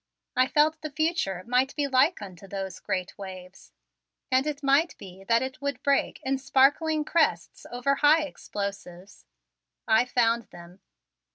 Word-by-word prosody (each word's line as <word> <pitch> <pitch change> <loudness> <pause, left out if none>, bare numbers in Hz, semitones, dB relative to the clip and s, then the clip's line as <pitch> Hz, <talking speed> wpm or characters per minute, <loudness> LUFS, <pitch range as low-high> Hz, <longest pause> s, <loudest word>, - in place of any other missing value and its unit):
I 255 +1 +3
felt 310 +2 +2
the 310 - -5
future 300 - -1
might 250 +3 +1
be 290 - 0
like 265 - +2
unto 190 -1 -11
those 195 -1 -6
great 185 -1 -3
waves, 185 -1 -10 0.6
and 260 +3 +2
it 290 -1 -4
might 280 +5 +2
be 190 0 -12
that 230 +3 +2
it 265 +1 -6
would 280 -2 -3
break 280 -1 +1
in 270 0 -1
sparkling 290 +3 +2
crests 330 0 0
over 245 +3 0
high 300 +2 +5
explosives. 200 -8 -7 0.6
I 225 +2 +4
found 235 -2 +1
them! 175 +2 -14
255 Hz, 150 wpm, -26 LUFS, 195-290 Hz, 0.6 s, high